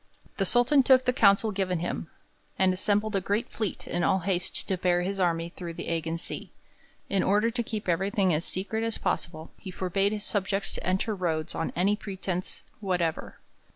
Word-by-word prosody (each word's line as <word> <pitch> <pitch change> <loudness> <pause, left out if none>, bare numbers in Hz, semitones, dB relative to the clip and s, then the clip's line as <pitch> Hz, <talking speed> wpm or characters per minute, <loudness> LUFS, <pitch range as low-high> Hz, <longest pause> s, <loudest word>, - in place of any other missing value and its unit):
The 195 - +1
Sultan 245 +7 +5
took 260 0 +5
the 250 - +3
counsel 200 0 +4
given 190 -2 0
him, 170 -1 -3 0.5
and 185 -1 +4
assembled 210 +2 0
a 195 - +2
great 205 +4 -1
fleet 215 -4 -3
in 175 0 -1
all 190 +1 +3
haste 180 0 -1
to 190 - +1
bear 175 -1 +2
his 195 +2 -2
army 170 -2 +1
through 170 -1 -7
the - - -5
Ægean 165 0 -1
Sea. 165 - -5 0.6
In 195 -1 +1
order 210 +4 +3
to 240 +1 -1
keep 215 -3 -4
everything 190 +2 +2
as 155 +2 0
secret 210 +6 -3
as 230 -1 0
possible, 160 -1 -3
he 190 - -8
forbade 190 +2 0
his 210 -1 -3
subjects 195 -1 -1
to - - -5
enter 190 +4 0
Rhodes 165 -5 -2
on 165 - -2
any 195 +4 +3
pretence 190 -3 -4 0.2
whatever. 175 -5 -1
190 Hz, 190 wpm, -28 LUFS, 175-210 Hz, 0.6 s, Sultan